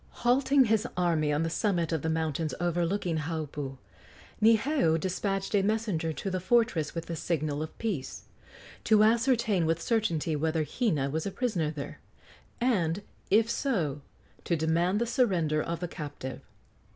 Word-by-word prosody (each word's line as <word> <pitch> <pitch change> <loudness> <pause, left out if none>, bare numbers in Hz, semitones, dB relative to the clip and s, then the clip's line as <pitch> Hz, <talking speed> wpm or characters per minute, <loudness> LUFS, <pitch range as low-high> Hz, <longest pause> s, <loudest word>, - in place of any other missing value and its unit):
Halting 265 +2 +5
his 220 +1 +1
army 165 -4 +2
on 150 +2 +1
the 165 - -1
summit 175 -4 0
of 160 -3 0
the 160 - -1
mountains 160 -1 -1
overlooking 175 0 0
Haupu, 145 -3 -4 0.6
Niheu 220 - +3
despatched 195 +3 -2
a 205 - +4
messenger 200 -6 0
to 195 +5 -4
the 185 - -1
fortress 185 -5 +1
with 165 0 -4
a - - -2
signal 155 -2 -2
of 155 - -6
peace, 185 - -4 0.6
to 215 -1 +5
ascertain 225 -5 +3
with 165 0 +1
certainty 170 -7 0
whether 160 +1 0
Hina 150 - 0
was 160 +5 -2
a - - -3
prisoner 190 -10 -1
there, 150 -2 -7 0.6
and, 200 -7 +1 0.3
if 220 +3 +4
so, 175 - -1 0.4
to 170 - 0
demand 170 +5 +1
the 235 - +1
surrender 185 - +1
of 170 +1 -4
the 175 - -2
captive. 145 -5 -7
170 Hz, 150 wpm, -29 LUFS, 160-220 Hz, 0.6 s, Halting